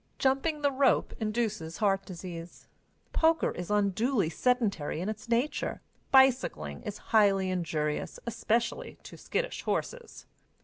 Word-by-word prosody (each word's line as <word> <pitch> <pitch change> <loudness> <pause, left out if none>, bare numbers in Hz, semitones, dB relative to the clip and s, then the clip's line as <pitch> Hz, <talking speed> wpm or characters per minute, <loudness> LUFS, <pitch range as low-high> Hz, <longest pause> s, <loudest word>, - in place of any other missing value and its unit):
Jumping 285 +3 +1
the 285 - +3
rope 265 -1 +2
induces 215 -7 -2
heart 195 -2 +1
disease. 170 -2 -8 0.5
Poker 325 0 +3
is 180 +1 -6
unduly 210 -1 +1
sedentary 215 -11 0
in 185 +5 -2
its 215 +2 -7
nature. 240 +6 0 0.3
Bicycling 250 - +3
is 210 - -6 0.2
highly 195 -3 +4
injurious, 155 -4 -2
especially 235 0 -1
to - - -10
skittish - - -3
horses. 485 -1 -4
215 Hz, 120 wpm, -29 LUFS, 180-260 Hz, 0.5 s, highly